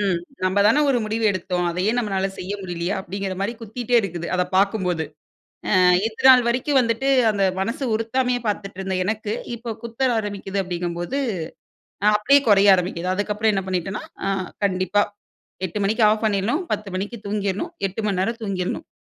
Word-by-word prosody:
ம். 190 -4 +1 0.3
நம்ம 185 +2 +1
தான 250 +8 +4
ஒரு 260 -3 +3
முடிவு 220 +1 -2
எடுத்தோம். 180 -1 -2
அதையே 180 +5 0
நம்மளால 195 -4 0
செய்ய 185 +2 -4
முடியலையா? 175 0 -3
அப்படிங்கிற 195 0 -4
மாதிரி 200 +4 -1
குத்திகிட்டே 235 +2 -3
இருக்குது. 175 -3 -4
அத 180 - +2
பார்க்கும்போது. 190 -5 +1 0.7
அ - - +5 0.3
இந்த 225 - -6
நாள் 255 -1 +8
வரைக்கும் 260 +4 +2
வந்துட்டு 230 +3 0 0.2
அந்த 200 -2 +1 0.2
மனசு 230 +7 -2
உறுத்தாமையே 245 +2 0
பார்த்துட்டு 200 -2 -3
இருந்த 190 -1 -2
எனக்கு, 215 +1 -2 0.2
இப்போ 235 0 -5
குத்த 235 +1 -9 0.2
ஆரம்பிக்குது 200 -2 -3
அப்படிங்கும்போது, 175 +7 -3 1.0
அப்படியே 275 +7 +5
குறைய 200 -1 +7
ஆரம்பிக்குது 180 0 -2
அதுக்கப்புறம் 210 +2 0
என்ன 195 -1 -1
பண்ணிட்டேனா, 185 +2 -2 0.2
அ - - +1 0.4
கண்டிப்பா, 185 +1 +2 0.6
8:00 185 +4 -5
மணிக்கு 220 +4 +1
ஆஃப் 220 +1 0
பண்ணிடணும். 215 - +1
10:00 210 -1 -2
மணிக்கு 205 +5 -4
தூங்கிடணும். 205 - -2
8 195 +3 -5
மணி 195 -3 0
நேரம் 230 +5 -1
தூங்கிடணும். 190 -3 -3
200 Hz, 160 wpm, -22 LUFS, 185-225 Hz, 1.0 s, நாள்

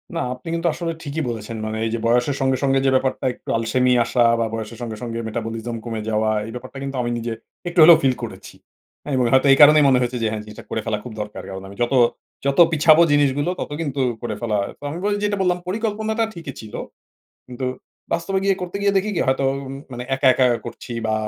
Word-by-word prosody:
না, - - -1 0.2
আপনি 125 - -16
কিন্তু 170 +1 -1
আসলে 170 -1 -3
ঠিকই 150 +1 -3
বলেছেন। 110 0 -5
মানে, 110 0 -3
এই - - 0
যে 115 - -1
বয়সের 120 +4 +2
সঙ্গে, 130 -1 +2
সঙ্গে 135 -1 +3
যে - - +5
ব্যাপারটা 130 0 0
একটু - - -13
আলসেমি 125 +3 +1
আসা 120 - +2 0.2
বা 115 - +1
বয়সের 115 0 -5
সঙ্গে, 115 -2 -5
সঙ্গে 115 -1 -4
metabolism 115 +1 -4
কমে 115 -2 -4
যাওয়া, 110 0 +1 0.2
এই - - -7
ব্যাপারটা 130 +2 -9
কিন্তু 135 0 -4
আমি 120 0 -2
নিজে 115 0 -4 0.4
একটু 175 0 -1
হলেও 165 +1 +9
ফিল 130 -2 +3
করেছি। - - -8 0.5
হ্যাঁ, 145 - -4
এবং 125 -1 +2
হয়তো 130 +1 +5
এই - - +3
কারণেই 150 +1 +8
মনে 130 -2 +4
হয়েছে 125 0 -1
যে - - +2
হ্যাঁ, 110 - -3
জিনিসটা 105 0 -11
করে 110 - -2
ফেলা 110 -1 -1
খুব 125 - -8
দরকার। 105 0 -6
কারণ 95 0 -6
আমি 100 - -11
যত, 120 +3 +1 0.5
যত 140 +2 +1
পিছাবো 160 +1 +6
জিনিসগুলো 145 +2 +2
তত - - -4
কিন্তু 140 -3 -2 0.2
করে 115 -3 -3
ফেলা। 110 -3 0 0.2
তো, - - -17
আমি 155 - -5
বলি 205 0 +1
যেটা 205 -1 0
বললাম, 180 -1 +2
পরিকল্পনাটা 220 +2 -1
ঠিকই 165 -6 -8
ছিল। 110 - -12 0.7
কিন্তু 125 +1 -5 0.5
বাস্তবে 190 +3 0
গিয়ে 195 -1 +3
করতে 180 +2 -4
গিয়ে 200 0 +3
দেখি 200 +2 +1
কী, - - 0
হয়তো 135 +1 +1 0.2
উম 135 - -6 0.2
মানে 125 0 -5
একা, 135 +1 0
একা 130 0 +3 0.2
করছি 120 - -8
বা 110 - +1
130 Hz, 225 wpm, -21 LUFS, 115-160 Hz, 0.7 s, হলেও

